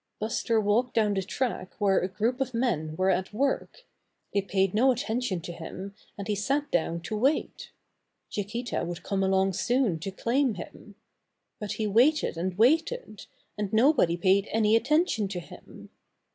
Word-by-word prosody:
Buster 225 Hz, +1 st, 0 dB
walked 220 Hz, +4 st, +1 dB
down 215 Hz, -2 st, +3 dB
the 195 Hz, -, 0 dB
track 190 Hz, -2 st, -3 dB
where 195 Hz, -2 st, +3 dB
a 185 Hz, -, -1 dB
group 225 Hz, +7 st, -1 dB
of 255 Hz, -2 st, -2 dB
men 160 Hz, -11 st, -1 dB
were 185 Hz, +3 st, +2 dB
at 190 Hz, 0 st, -1 dB
work. 275 Hz, -, -2 dB, 0.5 s
They 200 Hz, -, +2 dB
paid 190 Hz, 0 st, 0 dB
no 255 Hz, +5 st, +4 dB
attention 235 Hz, -5 st, -2 dB
to 175 Hz, -, -7 dB
him, 180 Hz, +4 st, -8 dB, 0.2 s
and 200 Hz, -, -6 dB
he 210 Hz, -, 0 dB
sat 275 Hz, +9 st, -1 dB
down 170 Hz, 0 st, 0 dB
to 215 Hz, -, -4 dB
wait. 265 Hz, +8 st, 0 dB, 0.6 s
Chiquita 220 Hz, +4 st, -3 dB
would 175 Hz, 0 st, -5 dB
come 195 Hz, -1 st, -1 dB
along 190 Hz, 0 st, +2 dB
soon 230 Hz, -3 st, +1 dB
to 180 Hz, -, -4 dB
claim 235 Hz, +5 st, 0 dB
him. 200 Hz, +3 st, -10 dB, 0.6 s
But 210 Hz, -2 st, -4 dB
he 220 Hz, -, -2 dB
waited 245 Hz, -, +3 dB
and 180 Hz, +2 st, -3 dB
waited, 325 Hz, -, +1 dB, 0.3 s
and 205 Hz, -2 st, -2 dB
nobody 220 Hz, -, +4 dB
paid 195 Hz, +3 st, +3 dB
any 220 Hz, 0 st, +3 dB
attention 260 Hz, -, +2 dB
to 190 Hz, -2 st, -4 dB
him. 175 Hz, -, -13 dB
210 Hz, 165 wpm, -27 LUFS, 190-245 Hz, 0.6 s, no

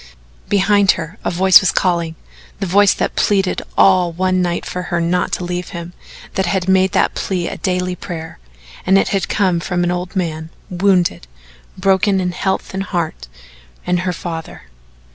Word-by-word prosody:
Behind 200 Hz, 0 st, +4 dB
her 165 Hz, -1 st, -7 dB
a -, -, 0 dB
voice 185 Hz, +2 st, +6 dB
was 190 Hz, -, +2 dB
calling, 170 Hz, -3 st, 0 dB, 0.4 s
the 195 Hz, -, -2 dB
voice 195 Hz, +2 st, +4 dB
that -, -, -2 dB
pleaded 195 Hz, -3 st, +1 dB, 0.2 s
all 185 Hz, -2 st, +4 dB
one 185 Hz, +2 st, 0 dB
night 175 Hz, -1 st, -1 dB
for 180 Hz, -, -4 dB
her 175 Hz, -2 st, 0 dB
not 175 Hz, +2 st, 0 dB
to -, -, -1 dB
leave 180 Hz, 0 st, -4 dB
him, 170 Hz, +1 st, -8 dB, 0.4 s
that 190 Hz, -1 st, 0 dB
had 185 Hz, 0 st, -1 dB
made 190 Hz, 0 st, +3 dB
that -, -, +2 dB
plea 180 Hz, -3 st, -2 dB
a -, -, -5 dB
daily 180 Hz, -1 st, -1 dB
prayer, 160 Hz, -, -8 dB, 0.4 s
and 190 Hz, +1 st, +4 dB
it -, -, +2 dB
had 195 Hz, -3 st, -1 dB
come 185 Hz, -5 st, +1 dB
from 175 Hz, +1 st, -1 dB
an 175 Hz, -, +1 dB
old 180 Hz, +2 st, -4 dB
man 160 Hz, -3 st, -3 dB, 0.2 s
wounded, 180 Hz, -, +1 dB, 0.5 s
broken 195 Hz, +1 st, +2 dB
in 180 Hz, -1 st, -1 dB
health 190 Hz, +2 st, -2 dB
and 195 Hz, +1 st, -3 dB
heart, 165 Hz, -, -3 dB, 0.6 s
and 180 Hz, 0 st, +1 dB
her 180 Hz, +1 st, -1 dB
father. 165 Hz, -, -7 dB
180 Hz, 175 wpm, -18 LUFS, 175-190 Hz, 0.6 s, voice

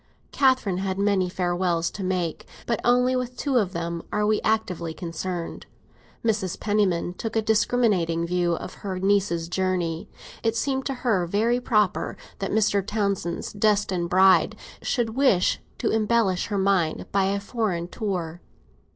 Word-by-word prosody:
Catherine 255 Hz, -9 st, +2 dB
had 190 Hz, -1 st, -2 dB
many 200 Hz, -2 st, +2 dB
farewells 175 Hz, -2 st, 0 dB
to 200 Hz, -, -6 dB
make, 180 Hz, -3 st, -2 dB, 0.2 s
but 235 Hz, -, 0 dB
with -, -, -3 dB
only 250 Hz, +1 st, +3 dB
two 255 Hz, +2 st, -1 dB
of 195 Hz, -4 st, -1 dB
them 170 Hz, 0 st, -3 dB
are 210 Hz, 0 st, +1 dB
we 215 Hz, 0 st, +2 dB
actively 185 Hz, -7 st, -1 dB
concerned. 170 Hz, 0 st, -5 dB, 0.6 s
Mrs. 205 Hz, -5 st, 0 dB
Penniman 195 Hz, -5 st, +1 dB
took 225 Hz, +4 st, -5 dB
a 225 Hz, -, +3 dB
discriminating 210 Hz, -7 st, +2 dB
view 175 Hz, 0 st, +1 dB
of -, -, -7 dB
her 195 Hz, -3 st, -3 dB
niece's 190 Hz, -4 st, +1 dB
journey; 175 Hz, -3 st, -1 dB, 0.3 s
it 225 Hz, 0 st, 0 dB
seemed 265 Hz, +2 st, -1 dB
to 275 Hz, -, -1 dB
her 190 Hz, -7 st, +2 dB
very 225 Hz, +7 st, +1 dB
proper 210 Hz, -6 st, +1 dB, 0.2 s
that 195 Hz, -, -2 dB
Mr. 205 Hz, -2 st, +2 dB
Townsend's 200 Hz, -4 st, -2 dB
destined 200 Hz, -4 st, +1 dB
bride 190 Hz, +1 st, +5 dB, 0.3 s
should 235 Hz, -3 st, 0 dB
wish 235 Hz, -7 st, +3 dB, 0.2 s
to -, -, 0 dB
embellish 215 Hz, -4 st, +1 dB
her 205 Hz, -, -2 dB
mind 190 Hz, -5 st, +1 dB
by 195 Hz, -1 st, +2 dB
a 200 Hz, +1 st, 0 dB
foreign 200 Hz, -5 st, -2 dB
tour. 180 Hz, -5 st, -4 dB
195 Hz, 150 wpm, -25 LUFS, 175-220 Hz, 0.6 s, bride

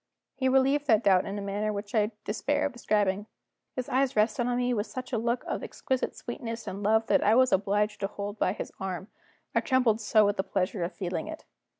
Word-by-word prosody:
He 260 Hz, -1 st, 0 dB
relieved 270 Hz, +2 st, +3 dB
that 220 Hz, -3 st, +4 dB
doubt 190 Hz, -2 st, +4 dB
in 200 Hz, +1 st, -4 dB
a 200 Hz, -, -4 dB
manner 205 Hz, +2 st, -1 dB
which 205 Hz, 0 st, -6 dB
I 210 Hz, -2 st, +3 dB, 0.2 s
despair 275 Hz, +7 st, 0 dB
of 285 Hz, -, -2 dB
describing. 205 Hz, -3 st, 0 dB, 0.5 s
His 255 Hz, -1 st, -3 dB
eyes 265 Hz, 0 st, +1 dB
rested 220 Hz, +3 st, +2 dB
on 245 Hz, 0 st, 0 dB
me 250 Hz, 0 st, +1 dB
with 210 Hz, -1 st, -1 dB
such 255 Hz, 0 st, -7 dB
a -, -, +2 dB
look 235 Hz, +2 st, 0 dB
of -, -, -3 dB
exquisite 260 Hz, -1 st, -2 dB
sweetness 230 Hz, -1 st, -6 dB
and 195 Hz, -, -5 dB
love 220 Hz, +2 st, +3 dB
that -, -, +3 dB
I 215 Hz, +2 st, +5 dB
was 255 Hz, +1 st, +5 dB
obliged 205 Hz, +2 st, +1 dB
to 195 Hz, -, -1 dB
hold 205 Hz, +1 st, -6 dB
by 185 Hz, -, +2 dB
his -, -, -6 dB
arm, 190 Hz, +1 st, -4 dB, 0.4 s
I -, -, +4 dB
trembled 250 Hz, -5 st, +2 dB
so 215 Hz, 0 st, +4 dB
with 205 Hz, 0 st, +1 dB
the 190 Hz, -, +1 dB
pleasure 185 Hz, -1 st, -1 dB
of 170 Hz, -, -4 dB
feeling 175 Hz, -4 st, -3 dB
it. 315 Hz, -, -8 dB
215 Hz, 225 wpm, -28 LUFS, 200-245 Hz, 0.5 s, I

